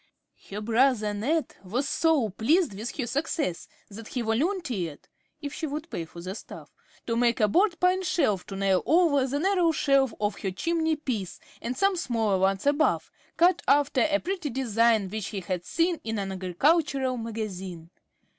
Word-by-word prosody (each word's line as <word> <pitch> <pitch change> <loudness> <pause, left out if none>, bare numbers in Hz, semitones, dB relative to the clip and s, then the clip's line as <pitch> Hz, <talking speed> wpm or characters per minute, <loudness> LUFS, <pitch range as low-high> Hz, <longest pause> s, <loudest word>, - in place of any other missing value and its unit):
Her 205 +2 -5
brother 225 -1 +2
Ned 285 +10 -1
was 240 +9 -2
so 305 -7 +2
pleased 300 - +2
with 215 +5 -6
her 260 - -1
success, 285 - -2 0.2
that 215 +2 -10
he 250 - -3
volunteered, 230 - -2 0.4
if 285 0 -4
she 320 - -3
would 305 +3 -6
pay 165 - -3
for 170 +1 -11
the 185 +2 -5
"stuff," - - -11 0.3
to 230 - -1
make 235 0 +2
a 215 - +4
broad 350 - +2
pine 365 +1 +3
shelf 215 - +1
to 195 - -6
nail 195 -1 +2
over 310 -5 +4
the 275 +2 -1
narrow 355 0 +2
shelf 275 -4 +2
of 205 -1 -1
her 195 - -2
chimney 320 - 0
piece, 230 - -4 0.2
and 245 +2 -4
some 395 +3 +3
smaller 225 - 0
ones 195 +3 +1
above, 290 +2 +2 0.3
cut 345 +1 +4
after 290 0 +3
a 300 0 +2
pretty 365 -4 -3
design 230 -4 +2
which 210 +1 -4
he 200 -3 -4
had 180 0 -3
seen 335 0 0
in 225 -1 -3
an 195 -1 -3
agricultural 260 - +1
magazine. 190 -7 -6
245 Hz, 175 wpm, -27 LUFS, 205-315 Hz, 0.4 s, a